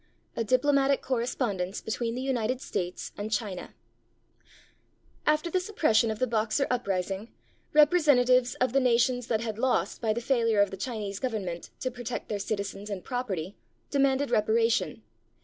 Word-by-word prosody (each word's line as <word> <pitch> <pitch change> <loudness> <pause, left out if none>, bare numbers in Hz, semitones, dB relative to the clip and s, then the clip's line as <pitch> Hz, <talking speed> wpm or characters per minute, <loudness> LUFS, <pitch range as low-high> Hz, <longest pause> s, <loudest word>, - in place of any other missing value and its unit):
A 230 - 0
DIPLOMATIC 275 +3 +3
CORRESPONDENCE 230 -7 -1
BETWEEN 230 +1 -2
THE 255 - -3
UNITED 255 -2 0
STATES 180 -7 -4
AND 210 +2 -4
CHINA 205 -5 -3 1.5
[After 305 +3 +2
the 370 - +2
suppression 315 - +2
of 220 - -2
the 255 - +1
Boxer 225 +3 +1
uprising, 200 -3 -2 0.5
representa 300 -4 +5
tives 250 0 +3
of 255 -1 +1
the 275 - +5
nations 245 -1 +2
that 220 -2 0
had 220 -2 -4
lost 260 +1 0
by 225 -2 +1
the 220 - -1
failure 230 -4 +2
of 200 -1 +4
the - - -4
Chinese 205 -2 -4
Government 200 -9 -3
to 255 - -1
protect 245 0 -5
their 210 - -2
citizens 200 0 -4
and 195 -3 -5
property 205 -8 -3 0.4
demanded 275 0 +2
reparation. 220 - +2
235 Hz, 150 wpm, -28 LUFS, 210-255 Hz, 1.5 s, representa